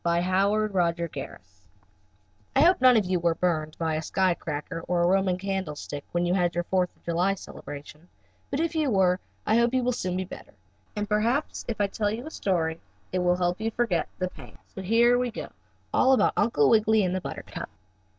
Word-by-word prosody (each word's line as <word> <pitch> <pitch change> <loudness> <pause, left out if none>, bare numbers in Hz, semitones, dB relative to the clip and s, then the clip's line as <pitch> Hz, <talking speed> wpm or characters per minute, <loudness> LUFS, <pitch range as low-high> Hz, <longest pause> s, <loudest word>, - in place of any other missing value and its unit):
STORY 170 0 +2
VI 180 - -2 0.2
UNCLE - - +3
WIGGILY 215 0 +2
AND 170 -4 0
BUTTERCUP 135 - -7 1.1
I 270 - +5
hope 350 +1 +5
none 255 -2 +7
of 210 - +2
you 180 0 0
were 170 -1 +1
burned 155 -4 -1
by 160 -1 -1
a 155 - -1
sky 185 +3 +1
cracker 165 +1 -5
or 175 -1 +1
a - - +4
Roman 190 0 +2
candle 190 -5 -3
stick 145 -1 -6
when 175 0 0
you 175 - +1
had 175 -2 +1
your 175 - 0
Fourth 180 0 +1
of - - -32
July 175 +4 +1
celebration, 150 -2 -10 0.4
but 275 - -2
if 330 0 0
you 310 -3 +1
were 190 -4 +3 0.3
I 220 - +3
hope 235 +2 +2
you 255 - +2
will 250 - +2
soon 185 -7 -2
be 185 - -2
better, 180 - -11 0.4
and 210 0 -2
perhaps 230 +8 0
if 230 - -3
I 205 - +3
tell 205 +1 -1
you 225 +5 -4
a 315 - -7
story 165 - -1 0.3
it 185 - 0
will 180 0 +2
make 180 +1 0
you 220 +1 -1
forget 225 -6 0
the 185 0 -2
pain. - - -13 0.2
So 190 - -6
here 235 +5 +4
we 250 0 0
go, 225 - -7 0.4
all 265 - +5
about 260 - +3
Uncle 205 -10 +3
Wiggily 220 -1 +4
and 180 -1 0
the 185 - -1
buttercup. - - -7
185 Hz, 220 wpm, -26 LUFS, 175-220 Hz, 1.1 s, none